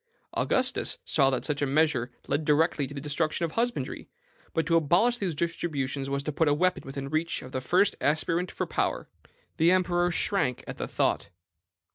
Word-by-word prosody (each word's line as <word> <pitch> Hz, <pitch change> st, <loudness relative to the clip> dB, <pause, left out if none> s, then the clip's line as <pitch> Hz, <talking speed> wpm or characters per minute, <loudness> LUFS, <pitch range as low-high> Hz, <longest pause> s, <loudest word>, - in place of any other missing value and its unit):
Augustus -, -, +1 dB
saw 135 Hz, -3 st, +3 dB
that 130 Hz, -2 st, -1 dB
such 145 Hz, -2 st, -1 dB
a -, -, +3 dB
measure 140 Hz, -4 st, +2 dB, 0.2 s
led 145 Hz, +2 st, 0 dB
directly 150 Hz, -1 st, +2 dB
to 140 Hz, -, -9 dB
the -, -, -4 dB
destruction 155 Hz, +3 st, -1 dB
of 165 Hz, -, -5 dB
husbandry; 240 Hz, +5 st, -2 dB, 0.4 s
but 165 Hz, -, 0 dB
to 165 Hz, -, +2 dB
abolish 175 Hz, +10 st, +3 dB
these 180 Hz, -6 st, -1 dB
distributions 145 Hz, -5 st, -2 dB
was 140 Hz, 0 st, -1 dB
to 150 Hz, -, -2 dB
put 160 Hz, +2 st, +1 dB
a 145 Hz, -, +4 dB
weapon 180 Hz, +4 st, +1 dB
within 135 Hz, 0 st, -6 dB
the 135 Hz, -, -6 dB
reach 160 Hz, +2 st, -1 dB
of 130 Hz, -, -10 dB
the 130 Hz, -, -3 dB
first 185 Hz, +9 st, +3 dB
aspirant 165 Hz, +4 st, +1 dB
for -, -, -3 dB
power. -, -, -1 dB, 0.5 s
"The 165 Hz, +2 st, +4 dB
emperor 175 Hz, -1 st, +2 dB
shrank 165 Hz, -, 0 dB
at -, -, -7 dB
the -, -, -3 dB
thought. -, -, 0 dB
155 Hz, 190 wpm, -28 LUFS, 140-175 Hz, 0.5 s, a